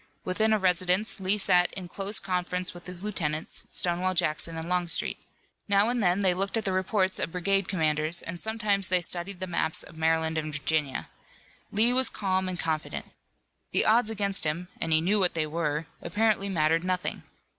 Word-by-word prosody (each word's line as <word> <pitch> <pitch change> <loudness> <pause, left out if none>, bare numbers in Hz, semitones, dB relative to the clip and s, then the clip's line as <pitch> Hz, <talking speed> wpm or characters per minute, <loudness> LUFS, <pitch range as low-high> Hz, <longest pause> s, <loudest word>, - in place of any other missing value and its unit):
Within 215 +4 +1
a 215 - +4
residence 185 +2 +1
Lee 190 +2 +2
sat 180 -3 +3
in 185 -2 -6
close 195 +4 +1
conference 180 0 -2
with 175 0 -12
his 180 +1 -3
lieutenants, 160 -7 -3
Stonewall 180 +1 0
Jackson 165 -1 +1
and 160 +1 -5
Longstreet. 175 -1 +1 0.5
Now 200 +2 +3
and 245 -1 0
then, 180 0 +2
they 185 -2 +3
looked 195 +4 -1
at 220 - -2
the 195 - +1
reports 185 0 +1
of - - -2
brigade 195 +2 0
commanders 155 -1 +1
and 170 +1 -5
sometimes 210 -3 0
they 180 0 +2
studied 175 +2 -3
the 185 - -3
maps 165 -3 -1
of - - -14
Maryland 160 0 +1
and 155 0 -4
Virginia. 145 -1 -1 0.6
Lee 230 +4 +3
was 260 +1 +3
calm 190 -2 -1
and 180 - -4
confident. 155 -2 -3 0.6
The - - +3
odds 220 0 +4
against 200 -2 0
him 170 +4 -1
and 165 - -2
he 155 0 +4
knew 200 +5 +2
what 180 -3 +2
they 160 -1 +1
were 155 0 -2 0.2
apparently 205 +2 +1
mattered 165 -2 +2
nothing. 185 0 -2
180 Hz, 185 wpm, -27 LUFS, 165-200 Hz, 0.6 s, a